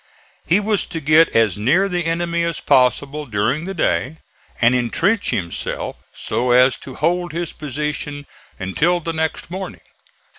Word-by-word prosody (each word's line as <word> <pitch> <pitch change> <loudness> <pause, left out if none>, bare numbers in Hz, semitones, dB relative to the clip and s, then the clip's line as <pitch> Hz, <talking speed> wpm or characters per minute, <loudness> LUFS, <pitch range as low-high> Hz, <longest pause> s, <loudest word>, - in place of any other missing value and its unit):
He 180 +5 +4
was 210 -1 0
to 165 - -5
get 155 +2 +4
as 110 -4 +3
near 160 - +3
the 175 -3 -2
enemy 170 0 0
as 170 -1 -2
possible 140 +3 +2
during 120 +9 0
the 195 +1 -5
day 130 - 0 0.4
and 120 +1 +4
intrench 165 - +1
himself 90 -8 -3 0.2
so 125 +1 -2
as 125 +1 +5
to 130 - -10
hold 175 -1 0
his 170 0 -3
position 145 0 -4 0.3
until 155 - +1
the 165 0 -4
next 160 +1 -3
morning. 190 +1 -6
155 Hz, 150 wpm, -20 LUFS, 125-175 Hz, 0.4 s, as